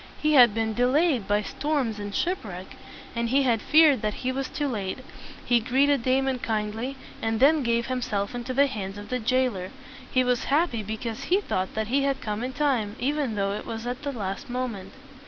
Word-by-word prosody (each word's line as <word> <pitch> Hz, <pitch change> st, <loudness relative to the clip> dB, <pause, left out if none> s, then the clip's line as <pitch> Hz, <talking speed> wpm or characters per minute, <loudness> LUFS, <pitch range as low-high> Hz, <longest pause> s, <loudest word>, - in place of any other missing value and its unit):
He 305 Hz, 0 st, +2 dB
had 240 Hz, -6 st, +7 dB
been 225 Hz, -1 st, 0 dB
de 245 Hz, +2 st, +2 dB
layed 285 Hz, -, +2 dB
by 205 Hz, +1 st, +2 dB
storms 270 Hz, -5 st, -2 dB
and 205 Hz, -1 st, -5 dB
ship 365 Hz, +2 st, 0 dB
wreck, 185 Hz, -3 st, -8 dB, 0.4 s
and 235 Hz, 0 st, -1 dB
he 275 Hz, +3 st, +3 dB
had 235 Hz, -4 st, +2 dB
feared 305 Hz, -3 st, +5 dB
that 210 Hz, -1 st, -1 dB
he 255 Hz, -, +2 dB
was 265 Hz, 0 st, -3 dB
too 290 Hz, -, -2 dB
late. 200 Hz, -7 st, -3 dB, 0.5 s
He 240 Hz, -1 st, +4 dB
greeted 265 Hz, +4 st, +2 dB
Damon 260 Hz, +1 st, +1 dB
kindly, 225 Hz, +4 st, -3 dB, 0.2 s
and 225 Hz, 0 st, -1 dB
then 295 Hz, +4 st, +5 dB
gave 235 Hz, -1 st, +1 dB
himself 240 Hz, -6 st, -2 dB
into 245 Hz, +1 st, -4 dB
the 275 Hz, +2 st, +4 dB
hands 205 Hz, -7 st, -5 dB
of 205 Hz, 0 st, -9 dB
the 250 Hz, -, -1 dB
jailer. 240 Hz, -6 st, 0 dB, 0.4 s
He 255 Hz, -, +3 dB
was 250 Hz, -1 st, 0 dB
happy 285 Hz, -5 st, +1 dB
because 220 Hz, +2 st, -5 dB
he 375 Hz, +3 st, +3 dB
thought 190 Hz, -, -3 dB
that 220 Hz, 0 st, -2 dB
he 275 Hz, +3 st, +2 dB
had 275 Hz, -1 st, 0 dB
come 215 Hz, -1 st, -3 dB
in 255 Hz, +1 st, -3 dB
time, 250 Hz, -8 st, 0 dB
even 280 Hz, -3 st, -1 dB
though 195 Hz, -1 st, 0 dB
it 205 Hz, -, -5 dB
was 225 Hz, 0 st, -5 dB
at 245 Hz, +1 st, -4 dB
the 285 Hz, -1 st, -3 dB
last 200 Hz, 0 st, -5 dB
moment. 245 Hz, -6 st, -4 dB
245 Hz, 210 wpm, -26 LUFS, 215-270 Hz, 0.5 s, had